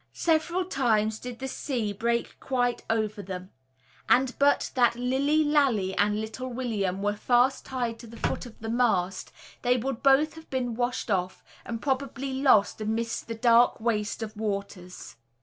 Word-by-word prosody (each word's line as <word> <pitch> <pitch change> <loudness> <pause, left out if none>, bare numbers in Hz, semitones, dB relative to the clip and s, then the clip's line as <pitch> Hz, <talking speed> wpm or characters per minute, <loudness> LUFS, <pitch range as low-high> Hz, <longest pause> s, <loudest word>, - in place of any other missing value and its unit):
Several 340 +2 +1
times 220 - +1
did 250 -1 -7
the 265 - -5
sea 245 -6 -3
break 235 +3 -2
quite 245 -2 -1
over 215 -2 -1
them; 185 -1 -7 0.6
and 255 0 +4
but 285 0 +3
that 240 -3 +3
Lilly 270 +5 +1
Lalee 260 -11 +2
and 210 +1 +2
little 220 +4 -5
William 205 -6 -2
were 205 0 +1
fast 250 +4 +2
tied 240 -3 -3
to 235 - -11
the 230 +1 -11
foot 250 - -2
of 230 - -15
the 225 - -4
mast, 200 -6 0 0.3
they 245 +1 +2
would 250 0 -3
both 280 +3 +4
have 320 0 -13
been 250 -3 -2
washed 245 -1 -2
off, 185 -1 -1 0.2
and 230 -1 -5
probably 270 0 -2
lost 220 -6 +4
amidst 225 +2 -2
the 230 - -4
dark 235 +1 +4
waste 220 -1 -1
of 215 0 -7
waters. 200 - -5
235 Hz, 165 wpm, -27 LUFS, 215-260 Hz, 0.6 s, and